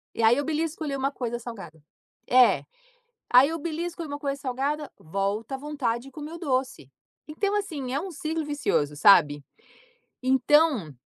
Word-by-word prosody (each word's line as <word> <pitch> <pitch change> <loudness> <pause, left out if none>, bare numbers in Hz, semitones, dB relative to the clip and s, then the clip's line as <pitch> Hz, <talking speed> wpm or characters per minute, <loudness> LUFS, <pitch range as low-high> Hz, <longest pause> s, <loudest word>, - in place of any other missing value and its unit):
E 230 - -1
aí, 230 +4 +5
eu 285 - -1
belisco 320 +1 -2
ali 280 -2 -2
uma 275 +1 -1
coisa 240 -3 -4
salgada 195 -10 -9 0.5
É. 250 -1 +5 0.7
Aí 255 +3 +7
eu 330 - -3
belisco 340 +2 -4
ali 320 - -6
uma 285 - -4
coisa 280 -2 -3
salgada, 280 +3 -2
volta 200 - -3
a - - -14
vontade 270 -5 -2
de 275 - -12
comer 300 +2 -8
o - - -7
doce. 260 - -2 0.4
Então, 400 +7 -1
assim, 290 -11 -3
é 280 - 0
um 380 +3 -6
ciclo 315 +1 -3
vicioso, 285 - -1
sabe. 145 -3 +5 0.8
Então 260 - +3
275 Hz, 170 wpm, -26 LUFS, 235-305 Hz, 0.8 s, Aí